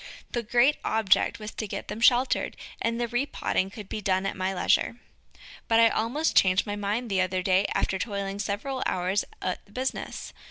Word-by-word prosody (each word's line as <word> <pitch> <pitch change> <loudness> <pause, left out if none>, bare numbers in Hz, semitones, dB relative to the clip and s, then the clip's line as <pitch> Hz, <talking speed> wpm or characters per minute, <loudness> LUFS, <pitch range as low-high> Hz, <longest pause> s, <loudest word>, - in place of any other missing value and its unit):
The 240 - -1
great 240 +6 +3
object 220 -4 +2
was 215 0 -7
to 215 - -5
get - - -5
them 210 +3 -6
sheltered, 250 +2 +3 0.2
and 230 0 0
the 240 - 0
repotting 240 -6 -1
could 205 0 -9
be 215 - -4
done 190 -1 +1
at 195 - -2
my 185 0 -1
leisure. 190 +4 +2 0.7
But 225 0 +4
I 230 0 +7
almost 250 +10 0
changed 185 0 +4
my 205 - -3
mind 205 +4 -2
the 195 -3 +1
other 185 0 -1
day 190 +1 +3
after 190 - 0
toiling 200 -1 -3
several 215 +7 -3
hours 185 +3 0 0.2
at 185 - -2
the 200 - -23
business. 260 +4 -4
210 Hz, 190 wpm, -27 LUFS, 190-235 Hz, 0.7 s, I